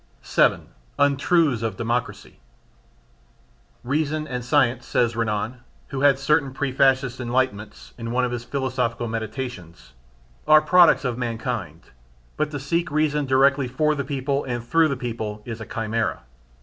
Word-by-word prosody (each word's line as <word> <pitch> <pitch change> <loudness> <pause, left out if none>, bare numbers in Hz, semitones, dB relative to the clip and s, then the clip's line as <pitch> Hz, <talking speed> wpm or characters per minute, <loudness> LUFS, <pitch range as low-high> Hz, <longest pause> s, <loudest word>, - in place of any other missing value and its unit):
7. - - +2 0.3
Untruths 145 -1 +2
of 115 -1 -3
Democracy. 115 -3 -3 1.4
"Reason 155 +3 -1
and 125 -3 -4
science" 125 -2 +2
says 120 -1 +1
Renan 115 +2 -2 0.3
(who 135 -1 -4
had 140 -2 +5
certain 140 0 +1
pre 135 -1 -1
fascist 130 -1 +2
enlightenments) 120 -4 -2
in 115 0 -5
one 125 +2 +1
of 125 - -3
his 120 -1 -4
philosophical 125 -2 -2
meditations, 110 - -6 0.5
"are 155 - +8
products 170 -5 +5
of 125 -1 -2
mankind, 115 - -4 0.4
but 155 - -1
to 145 -1 -5
seek 165 +6 -1
reason 150 -1 0
directly 135 +1 +3
for 150 +5 +1
the 140 -2 -2
people 140 +1 -2
and 120 -2 -3
through 165 +6 +3
the 140 -3 -2
people 110 -4 -5
is 115 -2 -6
a 110 - -7
chimera. 110 - -2
130 Hz, 145 wpm, -23 LUFS, 115-140 Hz, 1.4 s, are